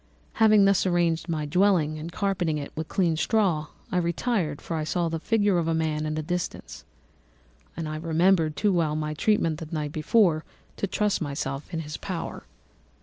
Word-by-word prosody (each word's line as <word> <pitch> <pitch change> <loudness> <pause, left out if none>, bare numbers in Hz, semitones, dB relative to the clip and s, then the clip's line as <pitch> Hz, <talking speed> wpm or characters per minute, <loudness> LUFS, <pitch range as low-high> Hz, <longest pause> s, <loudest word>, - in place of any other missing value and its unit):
"Having 215 -2 +5
thus 195 -1 +3
arranged 170 -1 +1
my 155 -2 -1
dwelling 160 -2 +2
and 165 +2 -6
carpeted 180 -5 0
it 140 -1 -6
with 160 0 -4
clean 170 -4 +1
straw, 180 -6 +1 0.2
I 180 - 0
retired, 170 -2 0
for 165 - -5
I 155 - -1
saw 170 +2 0
the 165 0 -3
figure 205 -1 +2
of 165 - -1
a 165 - +1
man 155 -1 -1
at 155 0 -2
a 155 - -2
distance, 175 +2 -4 0.9
and 165 -2 -3
I 155 0 -4
remembered 165 0 +2
too 205 -2 +2
well 160 -4 +1
my 155 0 -2
treatment 165 -2 +1
the 160 - -7
night 150 -3 -2
before 160 +1 +2 0.3
to 200 - -1
trust 210 +1 0
myself 140 -1 -4
in 165 - -2
his 150 -1 -6
power. 180 -4 -5
165 Hz, 185 wpm, -26 LUFS, 155-190 Hz, 0.9 s, Having